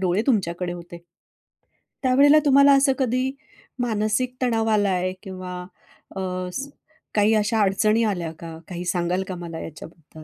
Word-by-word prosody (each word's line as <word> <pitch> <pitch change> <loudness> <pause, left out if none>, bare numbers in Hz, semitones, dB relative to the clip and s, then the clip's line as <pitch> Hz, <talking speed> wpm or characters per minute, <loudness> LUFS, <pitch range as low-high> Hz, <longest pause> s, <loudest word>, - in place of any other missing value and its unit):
डोळे 185 +2 +1
तुमच्याकडे 180 -7 0
होते. 175 0 -9 1.1
त्यावेळेला 280 +4 +6
तुम्हाला 280 0 +6
असं 270 -1 +3
कधी 255 +1 0 0.5
मानसिक 230 +2 0
तणाव 225 -3 +1
आलाय 190 -4 +1
किंवा 185 -2 -7 0.6
अ, - - -4 0.3
स 275 +1 -4 0.5
काही 210 +1 +4
अशा 215 +1 +1
अडचणी 215 +3 +2
आल्या 175 -6 -1
का? 165 -1 -8
काही 180 -1 -6
सांगाल 180 +1 0
का 185 - -4
मला 170 -2 -7
याच्याबद्दल? 160 0 -11
205 Hz, 135 wpm, -23 LUFS, 175-245 Hz, 1.1 s, त्यावेळेला